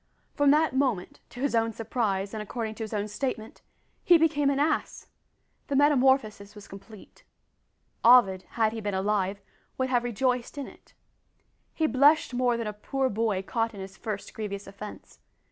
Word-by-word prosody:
From 290 -1 +3
that 300 -1 +3
moment 255 -9 -1
to 245 - -10
his 280 -2 0
own 225 -1 +1
surprise, 205 -3 -2
and 215 - -4
according 220 +1 -4
to 225 - -6
his 215 - -7
own 210 -1 -2
statement 220 +1 -5 0.4
he 350 - +6
became 300 -3 +2
an 280 - 0
ass! 300 +1 -1 0.6
The 280 - -2
metamorphosis 265 -7 +2
was 205 -1 -12
complete. 200 +2 -14 0.8
Ovid, 225 -6 +6 0.2
had 220 -1 +2
he 225 - -5
been 205 -2 -2
alive, 200 0 -1 0.4
would 260 0 -1
have 245 -2 +1
rejoiced 245 +2 -1
in 280 - -4
it! - - -18 0.8
He 320 - +1
blushed 290 +2 +4
more 245 -1 +1
than 230 - -3
a 210 - -4
poor 265 +5 -2
boy 210 -3 -1
caught 225 +2 -2
in - - -9
his 190 0 -8
first 210 -2 -6
grievous 205 -2 -5
offence. 200 +2 -11
225 Hz, 170 wpm, -27 LUFS, 205-265 Hz, 0.8 s, he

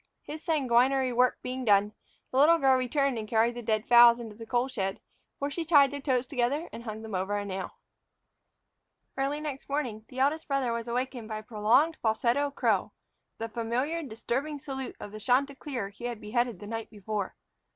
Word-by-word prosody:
His 305 +1 -7
sanguinary 265 -4 +2
work 250 +1 +3
being 255 +1 -4
done, 205 -2 +3 0.4
the 260 - +1
little 325 +4 +7
girl 270 -4 +4
returned 260 0 0
and 215 - -6
carried 225 +2 +2
the 240 - -6
dead 215 -1 -1
fowls 240 0 +8
into 225 -3 -8
the 225 +1 -10
coal 245 +1 +1
shed, 195 -7 -3 0.4
where 280 +1 -2
she 335 - -2
tied 290 -4 +5
their 285 0 -5
toes 260 -3 +1
together 270 +5 -1
and - - -7
hung 220 0 -6
them 220 -2 -8
over 190 +2 -1
a 205 - -3
nail. 190 -1 -5 1.4
Early 275 +2 -1
next 290 -3 -6
morning 245 -7 -2
the 255 - -12
eldest 290 +4 +1
brother 275 -4 0
was 230 0 -4
awakened 245 -1 -3
by 215 - -3
a 215 - -8
prolonged 235 +9 +2
falsetto 240 +6 +1
crow, 280 - 0 0.4
the 225 - -3
familiar 240 +8 -2
disturbing 275 +3 -3
salute 270 -2 -6
of 205 - -8
the 215 - -8
chanticleer 260 -2 0
he 210 +4 -10
had 240 -2 -3
beheaded 240 0 -1
the 205 - -9
night 225 +1 -5
before! 205 -1 -4
245 Hz, 190 wpm, -29 LUFS, 220-275 Hz, 1.4 s, fowls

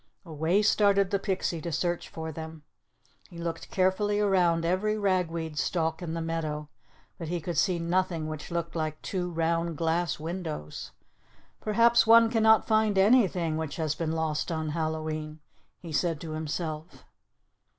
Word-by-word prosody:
Away 165 +5 +1
started 200 -2 +3
the 200 - +1
pixie 190 -4 -2
to 170 - -4
search 175 +2 -1
for 160 0 -6
them. 160 0 -8 0.7
He 175 - -12
looked 170 -1 -5
carefully 200 +2 +1
around 180 -5 +2
every 200 +5 +1
ragweed 170 -6 -1
stalk 160 -2 -1
in 165 -2 -4
the 165 - -3
meadow, 155 -2 -3 0.5
but 165 - -5
he 175 +2 -2
could 170 +1 -4
see 180 +2 +2
nothing 170 -1 0
which 155 -1 -6
looked 170 0 -3
like 155 -1 -2
"two 180 -2 -2
round 165 -1 -1
glass 165 0 0
windows." 160 - -5 0.7
"Perhaps 230 +2 +4
one 230 0 +7
cannot 220 -1 +5
find 215 -2 +2
anything 190 -7 +3
which 160 -2 -4
has 155 -3 -1
been 160 0 -2
lost 160 0 -1
on 160 -1 -2
Hallowe'en," 155 -1 -3 0.4
he 170 - -9
said 155 +2 0
to 160 - -6
himself. 155 +1 -5
170 Hz, 150 wpm, -28 LUFS, 160-190 Hz, 0.7 s, one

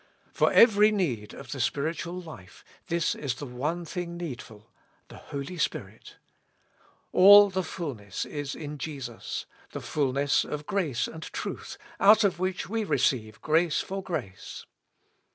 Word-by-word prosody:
For - - +3
every 215 -2 +6
need 135 - -2
of 135 -3 -10
the 135 - -5
spiritual 165 +6 -2
life 155 - -12 0.2
this 170 -1 +1
is 135 -4 -3
the 145 - -7
one 150 +7 -3
thing 170 +1 -5
needful: 120 -10 -8 0.4
the - - -11
Holy 140 +5 -7
Spirit. - - -4 1.0
All 205 +2 +9
the 190 0 0
fulness 135 - -5
is 145 -2 -5
in 150 -1 -7
Jesus; 135 -5 -5 0.3
the - - -4
fulness 140 -1 +1
of 150 0 -5
grace 165 - -1
and 160 - -9
truth, - - -6 0.2
out 215 +2 +7
of 190 -4 +1
which 185 0 -2
we 225 +3 -1
receive 120 - 0
grace 160 +1 +2
for 195 +1 -5
grace. 100 - -6
155 Hz, 140 wpm, -27 LUFS, 135-185 Hz, 1.0 s, All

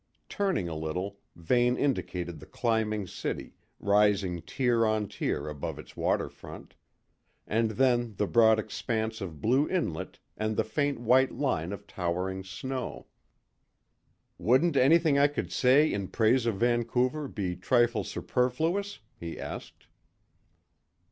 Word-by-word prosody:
Turning 190 - 0
a 85 - -4
little, 90 +6 -4 0.2
Vane 120 +8 +2
indicated 90 - -2
the 75 - -13
climbing 110 -3 0
city, - - -5 0.3
rising 100 -3 +2
tier 120 - +1
on 110 -1 +1
tier 75 - -2
above 75 -2 -5
its - - -12
water - - 0
front; - - -12 0.7
and 115 +1 +1
then 120 -1 +1
the 105 - 0
broad 110 +1 +5
expanse 110 +1 -3
of 80 -6 -6
blue 130 +6 +2
inlet 90 - -2 0.2
and 110 0 -2
the - - +3
faint 145 +3 -1
white 125 +3 +4
line 120 - -1
of 100 0 -7
towering 95 0 -3
snow. 125 +7 -5 1.3
"Wouldn't 130 - +3
anything 150 +2 +5
I 140 - +6
could 145 - -4
say 140 +5 +4
in 100 -2 -2
praise 115 +4 +2
of 115 - +1
Vancouver 120 +5 +1
be 95 -7 -3
trifle 120 +5 +2
superfluous?" 160 +11 -1 0.2
he 85 0 -6
asked. - - -8
115 Hz, 130 wpm, -29 LUFS, 95-130 Hz, 1.3 s, I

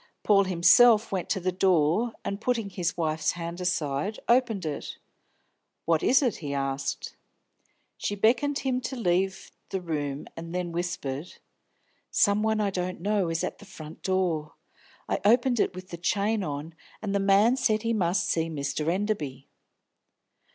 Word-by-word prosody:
Paul 200 -2 +4
himself 215 +6 +5
went 185 -3 -2
to 195 - 0
the 185 0 -1
door, 185 +4 +2
and, 200 +1 -3
putting 230 -5 -1
his 180 -2 -2
wife's 155 -2 0
hand 170 +1 -6
aside, 165 +2 -1
opened 235 -7 +2
it. 150 -2 -5 0.9
"What 165 -1 +2
is 270 +3 +4
it?" 245 -5 0
he 145 -3 -4
asked. 135 0 -3 0.8
She 205 - -2
beckoned 260 +8 +2
him 255 -2 -1
to 255 +2 -4
leave 190 -3 0 0.2
the 190 - -2
room, 150 -5 -3
then 170 +1 -4
whispered: 170 -3 -4 0.7
"Some 205 0 +3
one 220 0 +1
I 205 -2 +1
don't 180 -1 -3
know 200 -1 0
is 165 0 -1
at - - -4
the - - -13
front 160 -5 -11
door. 170 -5 -1 0.5
I - - 0
opened 240 +3 +3
it - - +1
with 185 0 -9
the 170 - -6
chain 205 +4 0
on, 150 +1 -5 0.3
and 200 -2 -2
a - - +3
man 200 +5 +4
said 220 -4 +1
he 230 0 0
must 185 -3 +1
see 165 0 0
Mr. 145 0 -3
Enderby." 170 -9 -2
185 Hz, 160 wpm, -27 LUFS, 165-215 Hz, 0.9 s, himself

